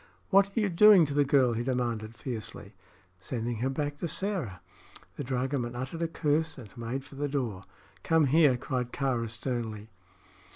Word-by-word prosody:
"What 195 0 +6
are 200 +3 -3
you 210 -2 +1
doing 190 0 +7
to 145 - -4
the 145 0 +4
girl?" 135 -4 +3
he 115 - -2
demanded, 120 -3 -2
fiercely. 110 -4 -6 0.5
"Sending 115 +3 -3
her 125 +4 0
back 145 +1 -3
to 170 - -2
Sĕra." 180 - -2 0.6
The - - -4
dragoman 125 -1 -2
uttered 130 +7 -5
a 165 - +1
curse 160 0 0
and 115 -5 -12
made 120 +3 -4
for - - -14
the 145 +1 -2
door. 115 -9 -3 0.4
"Come 160 -2 +3
here!" 140 -2 +4
cried 125 -1 -3
Kāra, 125 -5 -1
sternly. 110 -2 -4
130 Hz, 170 wpm, -29 LUFS, 120-150 Hz, 0.6 s, doing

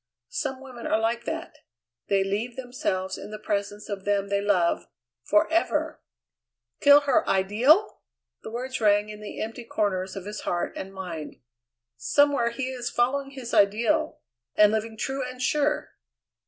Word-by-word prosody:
Some 275 - -3
women 255 -3 -8
are - - +2
like 230 +1 -1
that: 325 +2 -5 0.5
they 195 -1 +3
leave 210 +5 -2
themselves 190 -7 -3
in - - -8
the 215 - -6
presence 205 0 -3
of 200 -2 -5
them 200 0 0
they 200 0 +1
love 190 -4 +1 0.4
forever! 320 +11 +1 0.8
"Kill 285 0 +8
her 290 +3 +2
ideal!" 235 - +3 0.4
The - - -7
words 250 +2 -4
rang 205 0 +3
in 210 0 -9
the 210 - -7
empty 225 +2 -5
corners 190 -4 -1
of 195 -1 -6
his 210 +1 -6
heart 175 - -2
and 190 - -6
mind. 180 -5 -6 0.6
"Somewhere 280 - +3
he 255 +2 -3
is 245 -2 -3
following 275 +3 0
his 260 -4 -8
ideal, 235 +11 +2 0.4
and 210 0 +6
living 220 0 -2
true 270 +4 -2
and 255 0 -7
sure!" 295 +3 +1
225 Hz, 155 wpm, -26 LUFS, 200-265 Hz, 0.8 s, Kill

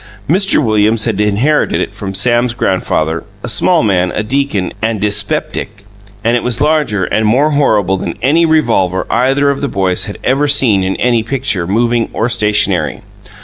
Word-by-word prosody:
Mr. 190 -1 +1
Williams 110 0 +2
had 110 -3 -1
inherited 110 +9 +1
it - - -3
from 100 -2 -6
Sam's 120 +2 +1
grandfather 80 -6 -1 0.2
(a - - -4
small - - +2
man, 90 -3 +1
a 105 - -1
deacon, 120 -5 -1
and 110 -1 -1
dyspeptic) 105 0 -1 0.4
and 115 +2 +2
it 120 - 0
was 125 -2 -1
larger 145 - +1
and 110 +3 0
more 140 +8 +2
horrible 105 -10 +1
than 85 -1 -5
any 145 +9 +2
revolver 115 - +1
either 135 +4 +2
of 140 - -5
the 140 - -1
boys 95 -5 0
had 105 - -7
ever 140 +3 +1
seen 120 -9 +3
in 95 +1 -1
any 120 -2 +1
picture, 115 -7 -2
moving 115 +3 0
or 115 - -1
stationary. 105 -3 0
115 Hz, 170 wpm, -13 LUFS, 100-135 Hz, 0.4 s, seen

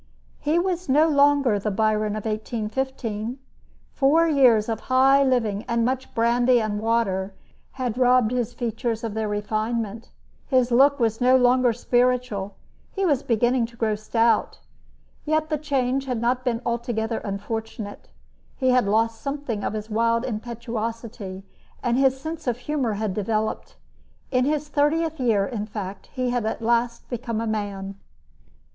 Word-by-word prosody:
He 305 +3 +1
was 360 -2 -1
no 300 +4 +5
longer 285 -7 +3
the 210 - -2
Byron 215 +1 +1
of 215 - -5
1815. 225 +1 -3 0.6
Four 315 +4 +4
years 250 -8 +4
of 225 -2 -2
high 270 +2 +5
living 225 -6 +1
and 235 -1 +1
much 260 +1 -3
brandy 240 +2 +3
and 215 -2 -2
water 205 -4 0 0.4
had 250 -2 -3
robbed 250 -2 +4
his 245 -2 -1
features 235 -1 -3
of 225 -2 -3
their 220 0 -2
refinement. 215 +1 -2 0.4
His 255 -2 +2
look 280 +4 +5
was 225 0 0
no 255 +1 +6
longer 250 0 +4
spiritual. 240 -4 0 0.4
He 390 -1 -1
was 285 -6 +2
beginning 240 0 +1
to 235 0 -18
grow 220 -2 +1
stout. 225 +2 +1 0.7
Yet 310 0 0
the 305 - 0
change 270 -2 0
had 250 -3 -1
not 250 +2 0
been 245 -1 -1
altogether 235 -1 -2
unfortunate. 205 +1 -6 0.5
He 260 -1 +1
had 250 -4 +3
lost 225 +2 +1
something 275 -7 -3
of - - -2
his 215 0 -6
wild 230 +2 +1
impetuosity, 230 -3 -5 0.4
and 240 -1 +1
his 265 0 +3
sense 315 0 -6
of 245 -1 0
humor 250 -2 -1
had 210 -1 -2
developed. 215 +2 -2 0.6
In 255 -1 +2
his 300 +1 -1
thirtieth 305 +2 +1
year, 220 -6 +2
in 215 -3 -4
fact, 200 -2 -7
he 255 -2 -1
had 245 -2 0
at - - -2
last 235 +1 0
become 235 -2 -3
a 230 - -2
man. 200 -3 -4
235 Hz, 150 wpm, -24 LUFS, 215-260 Hz, 0.7 s, no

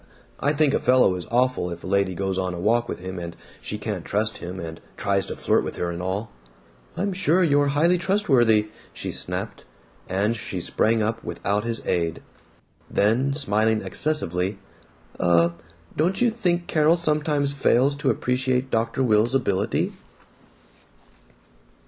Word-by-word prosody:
I 145 - +2
think 150 -2 +2
a - - +2
fellow 125 -6 +4
is 90 +1 -6
awful 125 -5 +1
if 85 -1 -7
a - - -8
lady 100 -1 +1
goes 95 0 -1
on 90 -1 -2
a - - -6
walk 115 +5 +1
with - - -3
him 95 0 -5
and 85 -1 -6 0.3
she 105 - -4
can't 105 -4 -4
trust 110 +2 -1
him 90 +2 -6
and 80 -2 -7
he - - -27
tries 100 -1 +1
to - - -4
flirt - - +1
with - - -5
her 85 - -2
and 85 +1 -5
all." 95 +4 -3 0.7
"I'm 200 0 -1
sure 185 -1 +2
you're 145 -3 +3
highly 170 +4 +4
trustworthy!" 125 - +3 0.2
she - - -4
snapped, - - -5 0.5
and 100 +5 +1
she 110 - -5
sprang 110 0 +1
up 115 +1 -2
without 105 +2 -2
his 115 -1 -2
aid. 85 -2 -1 0.7
Then, 125 +7 +2
smiling 110 -5 +1
excessively, 95 - -1 0.6
"Uh 85 -1 +4 0.5
don't 175 +5 +1
you 240 -1 +3
think 180 -6 0
Carol 155 +1 +3
sometimes 150 -3 0
fails 140 0 +3
to 140 -2 0
appreciate 130 +1 0
Dr. 115 +4 0
Will's 115 +1 +3
ability?" 100 -6 0
115 Hz, 160 wpm, -24 LUFS, 95-145 Hz, 0.7 s, fellow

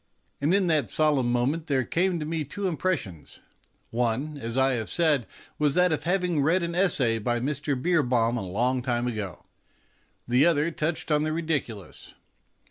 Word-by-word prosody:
And 145 +4 +2
in 195 0 +3
that 155 - +1
solemn 145 -4 +2
moment 135 +7 0
there 135 -3 +1
came 180 0 0
to 150 - -3
me 160 0 -2
two 195 +8 -4
impressions. 155 - -3 0.5
One, 125 +6 -1
as 115 -3 -5
I 135 0 +4
have 115 -4 -2
said, 155 -8 +1 0.3
was 150 -2 +2
that 180 -1 +4
of 155 - -2
having 180 -3 +1
read 170 +6 +2
an 170 0 -2
essay 145 -11 +2
by 120 +2 -1
Mr. 140 +1 -2
Beerbohm 125 -7 +2
a 120 - -2
long 120 +8 0
time 120 -1 -1
ago; 105 -7 -5 0.8
the 125 +3 +4
other 165 -1 +3
touched 160 +1 -2
the 150 0 +1
ridiculous. 150 - -4
145 Hz, 165 wpm, -26 LUFS, 120-165 Hz, 0.8 s, I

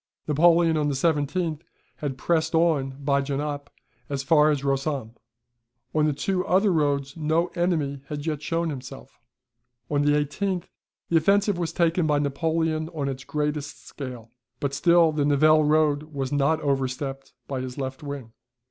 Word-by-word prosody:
Napoleon 165 +2 +4
on 150 -1 +1
the 145 - -1
17th 155 +2 0 0.4
had 140 -3 -4
pressed 160 +3 0
on 145 -5 +2
by 140 0 +2
Genappe 145 +1 -3 0.4
as 140 -1 -2
far 150 +2 +5
as 145 -2 0
Rossomme. 135 -3 -1 0.8
On 155 -1 +3
the - - +2
two 185 +5 -1
other 190 +2 +3
roads 140 -3 0
no 160 +2 +1
enemy 160 -6 -1
had 145 0 -5
yet 155 -3 -2
shown 165 +1 -1
himself. 135 0 -9 0.7
On 145 -1 +2
the 145 0 +3
18th 170 +5 -1 0.5
the 170 - +4
offensive 200 +3 +2
was 170 -2 -1
taken 170 -1 +1
by 150 -1 +2
Napoleon 160 +2 0
on 140 -3 -1
its 135 0 -5
greatest 150 0 -3
scale, 125 -5 -8 0.3
but 140 -1 -2
still 170 +2 +4
the 150 -1 0
Nivelles 155 +2 +4
road 150 -2 +3
was 135 -3 -3
not 145 +2 +2
overstepped 135 0 -2
by 135 -2 -3
his 130 -1 -6
left 135 -1 -4
wing. 140 -6 -7
150 Hz, 155 wpm, -25 LUFS, 140-160 Hz, 0.8 s, far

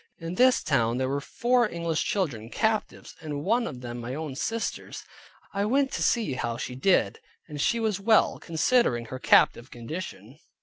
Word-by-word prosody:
In 165 0 -6
this 255 +6 +4
town 120 -5 +1
there 130 0 0
were 140 +2 -1
four 240 - +1
English 170 -3 -2
children, 130 - -2
captives; 220 - -2
and 145 -2 -5
one 230 +6 +1
of 125 - -7
them 120 -1 -6
my 120 +2 -5
own 155 -2 -5
sister's. 225 +11 -4 0.5
I 200 0 0
went 270 +4 +1
to - - -3
see 225 - +1
how 120 -2 -3
she 125 - -5
did, 155 +9 +2 0.3
and 150 -3 -5
she 235 - +1
was 215 -4 0
well, 220 +2 +3
considering 160 - +1
her 130 +3 -7
captive 120 -1 +4
condition. 125 - -8
160 Hz, 175 wpm, -27 LUFS, -, 0.5 s, this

